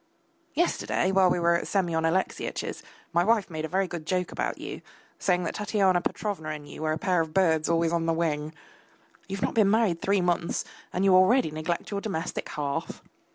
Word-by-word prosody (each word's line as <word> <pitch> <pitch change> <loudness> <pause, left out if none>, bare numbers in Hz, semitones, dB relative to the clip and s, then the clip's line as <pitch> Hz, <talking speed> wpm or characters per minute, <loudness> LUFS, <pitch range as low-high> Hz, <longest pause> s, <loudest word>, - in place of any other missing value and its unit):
Yesterday, 315 - +1
while 190 -1 +5
we 175 - +1
were 170 0 +3
at 170 - 0
Semyon 170 -5 0
Alexeyitch's, 185 +4 -1 0.3
my 170 +1 +4
wife 215 -2 +2
made 155 -1 -3
a - - -3
very 190 +4 0
good 170 -3 -7
joke 180 0 0
about - - -2
you, - - -7 0.4
saying 180 -1 +1
that - - -2
Tatyana 195 -4 +2
Petrovna 190 -7 -3
and 150 -1 -6
you - - -9
were 155 0 0
a 155 - 0
pair 180 0 +1
of 160 -1 -5
birds 160 -5 +3
always 165 0 +2
on 165 -1 0
the - - +3
wing. 155 -2 -1 0.8
You 195 - -4
have - - -4
not - - 0
been 215 -3 +4
married 205 -6 +2
three 200 0 +2
months 175 -1 0 0.3
and 185 +2 0
you 195 - +5
already 185 +1 +5
neglect 155 +5 -3
your 200 -1 -2
domestic 165 -7 -3
hearth. 145 -2 -4
175 Hz, 200 wpm, -27 LUFS, 160-195 Hz, 0.8 s, while